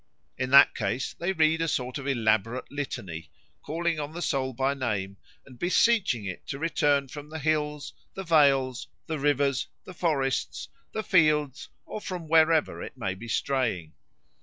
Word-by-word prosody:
In 130 Hz, 0 st, -3 dB
that 140 Hz, +1 st, +8 dB
case 125 Hz, +3 st, -2 dB
they 175 Hz, +3 st, -2 dB
read 160 Hz, -2 st, +2 dB
a 165 Hz, -, 0 dB
sort 125 Hz, -3 st, -2 dB
of 140 Hz, -, -7 dB
elaborate 115 Hz, -1 st, 0 dB
litany, 90 Hz, -, -5 dB, 0.3 s
calling 165 Hz, +1 st, -2 dB
on 150 Hz, +1 st, -5 dB
the 175 Hz, -, -6 dB
soul 130 Hz, -2 st, 0 dB
by 135 Hz, +3 st, 0 dB
name 105 Hz, -8 st, -3 dB, 0.3 s
and 125 Hz, -3 st, -15 dB
beseeching 180 Hz, -, +2 dB
it 90 Hz, -2 st, -7 dB
to 135 Hz, -, -4 dB
return 145 Hz, -3 st, +1 dB
from 145 Hz, +2 st, -9 dB
the 160 Hz, -, -6 dB
hills, 150 Hz, -1 st, -1 dB, 0.2 s
the 195 Hz, -, -5 dB
vales, 140 Hz, -6 st, +3 dB, 0.2 s
the 160 Hz, -2 st, -3 dB
rivers, 140 Hz, -2 st, +1 dB, 0.2 s
the 185 Hz, -, -10 dB
forests, 135 Hz, -, -1 dB, 0.2 s
the 220 Hz, -, -3 dB
fields, 150 Hz, -, +2 dB, 0.2 s
or 215 Hz, -, -6 dB
from 180 Hz, -5 st, -6 dB
wherever 160 Hz, -1 st, +3 dB
it -, -, -8 dB
may 95 Hz, -6 st, -2 dB
be 95 Hz, +5 st, -10 dB
straying. 115 Hz, -, -1 dB
140 Hz, 160 wpm, -27 LUFS, 125-160 Hz, 0.3 s, that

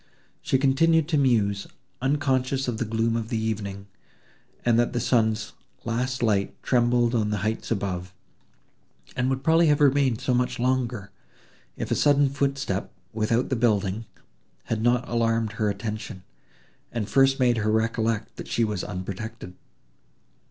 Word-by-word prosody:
She 130 Hz, -, +1 dB
continued 145 Hz, +4 st, +3 dB
to 155 Hz, -, +2 dB
muse, 105 Hz, -7 st, +1 dB, 0.3 s
unconscious 135 Hz, -1 st, 0 dB
of 115 Hz, -3 st, -2 dB
the 120 Hz, -, -1 dB
gloom 115 Hz, +1 st, 0 dB
of 115 Hz, +1 st, -3 dB
evening, 105 Hz, -3 st, -3 dB, 0.8 s
and 120 Hz, -1 st, +4 dB
that 120 Hz, -, +1 dB
the 120 Hz, -, 0 dB
sun's 110 Hz, -3 st, +1 dB, 0.3 s
last 125 Hz, +2 st, -1 dB
light 100 Hz, -3 st, +1 dB
trembled 120 Hz, -1 st, +2 dB
on 110 Hz, -3 st, +1 dB
the 105 Hz, -, -1 dB
heights 110 Hz, +1 st, -2 dB
above, 95 Hz, -4 st, -2 dB, 1.0 s
and 125 Hz, +1 st, 0 dB
would 135 Hz, 0 st, -2 dB
probably 165 Hz, +2 st, +4 dB
have 150 Hz, -1 st, +3 dB
remained 140 Hz, -4 st, +3 dB
so 130 Hz, -1 st, 0 dB
much 125 Hz, 0 st, 0 dB
longer, 120 Hz, -5 st, -1 dB, 0.7 s
if -, -, -4 dB
a -, -, +3 dB
sudden 145 Hz, -1 st, +4 dB
footstep, 135 Hz, -7 st, -2 dB, 0.2 s
without 115 Hz, +3 st, 0 dB
the 130 Hz, -, +1 dB
building, 110 Hz, -2 st, 0 dB, 0.6 s
had 110 Hz, -1 st, -2 dB
not 120 Hz, +1 st, +2 dB
alarmed 115 Hz, -2 st, 0 dB
her 105 Hz, 0 st, -1 dB
attention, 105 Hz, -1 st, -5 dB, 0.7 s
and 115 Hz, -4 st, -3 dB
first 135 Hz, +4 st, +3 dB
made 120 Hz, -2 st, +3 dB
her 110 Hz, 0 st, +1 dB
recollect 110 Hz, 0 st, -1 dB
that -, -, -7 dB
she 120 Hz, -, 0 dB
was 105 Hz, -4 st, -2 dB
unprotected. 95 Hz, +1 st, -6 dB
115 Hz, 145 wpm, -25 LUFS, 110-130 Hz, 1.0 s, and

